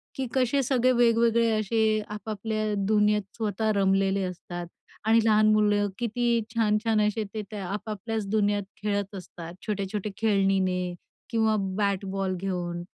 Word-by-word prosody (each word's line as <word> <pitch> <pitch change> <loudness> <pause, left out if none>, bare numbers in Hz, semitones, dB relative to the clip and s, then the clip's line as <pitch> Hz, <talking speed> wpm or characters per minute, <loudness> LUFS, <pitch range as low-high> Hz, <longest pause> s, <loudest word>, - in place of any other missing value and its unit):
की 265 -1 -2
कसे 260 +1 +2
सगळे 255 0 +2
वेगवेगळे 235 -1 +3
असे 215 0 +1
आपापल्या 215 +1 -3
दुनियेत 210 0 +3 0.2
स्वतः 220 0 0
रमलेले 195 0 +2
असतात 175 -1 -6 0.4
आणि 225 +1 +5
लहान 215 -1 +5
मुलं 205 -1 +3
किती 235 0 +1
छान-छान 220 0 +2
असे 215 +1 -1
ते 215 - -3
त्या 205 -3 -5
आपापल्याच 210 +2 -4
दुनियेत 205 -1 +1 0.2
खेळत 205 -1 -1
असतात, 170 -2 -9
छोट्या-छोट्या 205 0 -2
खेळण्यांनी 195 -4 +1 0.4
किंवा 220 -1 +2 0.2
बॅट-बॉल 195 -2 -1
घेऊन. 175 -3 -3
210 Hz, 125 wpm, -27 LUFS, 195-225 Hz, 0.4 s, आणि